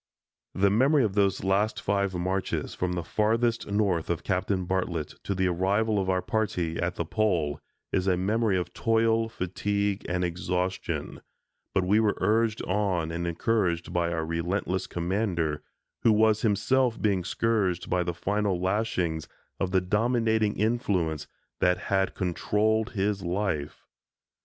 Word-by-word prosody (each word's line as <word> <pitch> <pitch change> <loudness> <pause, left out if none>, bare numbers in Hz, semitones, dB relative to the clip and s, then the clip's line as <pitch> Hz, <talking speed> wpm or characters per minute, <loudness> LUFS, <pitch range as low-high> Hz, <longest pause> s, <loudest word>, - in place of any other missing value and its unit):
The 100 +1 +3
memory 135 +6 +4
of 105 -4 0
those 100 -3 +1
last 100 +3 +1
five 100 -1 0
marches, 95 +2 -2
from 90 0 -2
the 85 -1 -2
Farthest 115 +5 +1
North 100 -5 +1
of 85 - -1
Captain 95 -1 0
Bartlett 90 -4 -1 0.2
to 100 - -1
the 95 0 +1
arrival 100 +4 +1
of 95 -1 -1
our 95 -1 +1
party 90 -7 -1
at 85 +1 -1
the 85 - -2
Pole, 85 -6 0 0.3
is 90 - 0
a 90 -2 +3
memory 105 +2 +1
of 90 -1 -3
toil, 115 0 +2
fatigue, 100 +1 -1
and 90 0 0
exhaustion, 90 +2 -2 0.5
but 95 - +2
we 100 +4 +4
were 110 -2 +2
urged 110 0 +1
on 95 -4 0
and 85 +1 -3
encouraged 85 -2 0
by 85 -1 +1
our 80 -1 -1
relentless 90 +3 -2
commander, 85 -4 -1 0.4
who 115 - +5
was 110 0 +4
himself 120 +3 +2
being 100 -5 +1
scourged 100 -3 0
by 90 - +1
the 85 -1 -2
final 100 0 0
lashings 90 -4 -1 0.3
of 95 - 0
the 95 0 +2
dominating 110 +2 +1
influence 95 -9 0 0.3
that 90 0 +3
had 95 -1 0
controlled 110 +5 0
his 100 -1 0
life. 90 -5 -2
95 Hz, 145 wpm, -27 LUFS, 90-110 Hz, 0.5 s, who